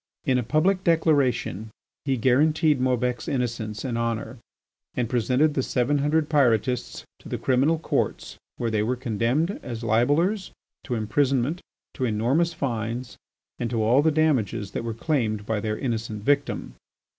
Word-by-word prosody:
In 130 Hz, -1 st, +2 dB
a -, -, -1 dB
public 175 Hz, -, +1 dB
declaration 140 Hz, -, +1 dB, 0.4 s
he 135 Hz, -2 st, +1 dB
guaranteed 150 Hz, +4 st, +3 dB
Maubec's 125 Hz, -2 st, 0 dB
innocence 115 Hz, -4 st, -2 dB
and 120 Hz, -3 st, -2 dB
honour, 115 Hz, +1 st, -3 dB, 0.6 s
and 125 Hz, -2 st, 0 dB
presented 125 Hz, +6 st, +2 dB
the 135 Hz, -, +1 dB
seven 130 Hz, +3 st, 0 dB
hundred 150 Hz, +2 st, +1 dB
Pyrotists 125 Hz, -4 st, +1 dB, 0.2 s
to -, -, -12 dB
the -, -, -2 dB
criminal 135 Hz, +6 st, +2 dB
courts 160 Hz, -, -2 dB, 0.2 s
where 115 Hz, -2 st, -1 dB
they 110 Hz, -1 st, +1 dB
were 120 Hz, +4 st, 0 dB
condemned, 125 Hz, -, -1 dB
as 120 Hz, -2 st, -6 dB
libellers, 145 Hz, -, +2 dB, 0.4 s
to 125 Hz, -, -2 dB
imprisonment, 130 Hz, +7 st, 0 dB, 0.3 s
to 130 Hz, -, -2 dB
enormous 125 Hz, +10 st, +1 dB
fines, 120 Hz, -4 st, -4 dB, 0.4 s
and 120 Hz, -, -1 dB
to 115 Hz, -3 st, 0 dB
all 120 Hz, +6 st, +4 dB
the 160 Hz, -, +3 dB
damages 135 Hz, -11 st, +1 dB
that -, -, -4 dB
were 115 Hz, -1 st, -4 dB
claimed 115 Hz, -7 st, -1 dB
by 110 Hz, 0 st, -1 dB
their 110 Hz, 0 st, -2 dB
innocent 115 Hz, -4 st, -3 dB
victim. 145 Hz, +3 st, 0 dB
125 Hz, 150 wpm, -25 LUFS, 115-145 Hz, 0.6 s, all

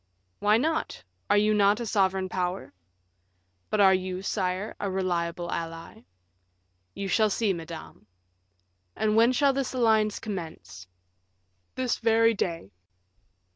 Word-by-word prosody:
"Why 210 Hz, +1 st, +4 dB
not? 315 Hz, +6 st, -2 dB, 0.3 s
Are 205 Hz, -, +4 dB
you 210 Hz, +1 st, +3 dB
not 205 Hz, +1 st, +3 dB
a 235 Hz, -, -3 dB
sovereign 190 Hz, -2 st, +1 dB
power?" 180 Hz, 0 st, -3 dB, 1.0 s
"But 215 Hz, -, 0 dB
are 190 Hz, -1 st, +7 dB
you, 185 Hz, 0 st, -2 dB
sire, 190 Hz, +1 st, -2 dB
a 200 Hz, -, -2 dB
reliable 175 Hz, -2 st, -2 dB
ally?" 165 Hz, -, -6 dB, 0.9 s
"You 200 Hz, -, -4 dB
shall 215 Hz, +2 st, +3 dB
see, 205 Hz, -1 st, +1 dB
madame." 165 Hz, -1 st, -9 dB, 0.9 s
"And 215 Hz, 0 st, +1 dB
when 230 Hz, +2 st, +5 dB
shall 275 Hz, +2 st, +3 dB
this 270 Hz, -1 st, -2 dB
alliance 220 Hz, -4 st, +2 dB
commence?" 165 Hz, -, -7 dB, 0.9 s
"This 255 Hz, -2 st, -1 dB
very 230 Hz, 0 st, +4 dB
day." 165 Hz, -, -3 dB
200 Hz, 125 wpm, -27 LUFS, 180-220 Hz, 1.0 s, are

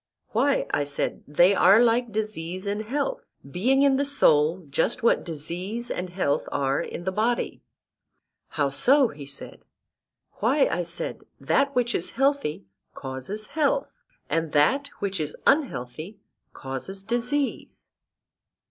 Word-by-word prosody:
Why, 270 Hz, +6 st, +1 dB
I 145 Hz, -, +2 dB
said, 145 Hz, 0 st, -2 dB
they 175 Hz, +7 st, +5 dB
are 195 Hz, +2 st, +6 dB
like 240 Hz, 0 st, +3 dB
disease 190 Hz, -4 st, -4 dB
and 205 Hz, +1 st, -2 dB
health; 295 Hz, -, -2 dB, 0.3 s
being 250 Hz, -, +2 dB
in 275 Hz, -1 st, +4 dB
the 280 Hz, -, +1 dB
soul 165 Hz, -, +3 dB
just 165 Hz, -, 0 dB
what 230 Hz, -, +3 dB
disease 175 Hz, +9 st, -5 dB
and 180 Hz, +1 st, -3 dB
health 175 Hz, -6 st, -1 dB
are 135 Hz, -1 st, 0 dB
in -, -, -6 dB
the 190 Hz, -, -1 dB
body. 225 Hz, +5 st, -1 dB, 0.9 s
How 145 Hz, -2 st, -1 dB
so? 265 Hz, -, +5 dB
he 140 Hz, -1 st, -10 dB
said. 140 Hz, -1 st, -9 dB, 0.8 s
Why, 265 Hz, +7 st, +3 dB
I 175 Hz, -, -1 dB
said, 170 Hz, 0 st, -4 dB, 0.2 s
that 280 Hz, 0 st, +1 dB
which 245 Hz, -1 st, +1 dB
is 170 Hz, -, -2 dB
healthy 270 Hz, -, 0 dB, 0.3 s
causes 135 Hz, +11 st, -6 dB
health, -, -, +1 dB, 0.4 s
and 165 Hz, -1 st, -1 dB
that 265 Hz, -, +3 dB
which 195 Hz, -2 st, -3 dB
is 150 Hz, -1 st, -3 dB
unhealthy 185 Hz, -, 0 dB, 0.3 s
causes 135 Hz, +9 st, -7 dB
disease. 245 Hz, +6 st, -2 dB
200 Hz, 135 wpm, -25 LUFS, 155-250 Hz, 0.9 s, are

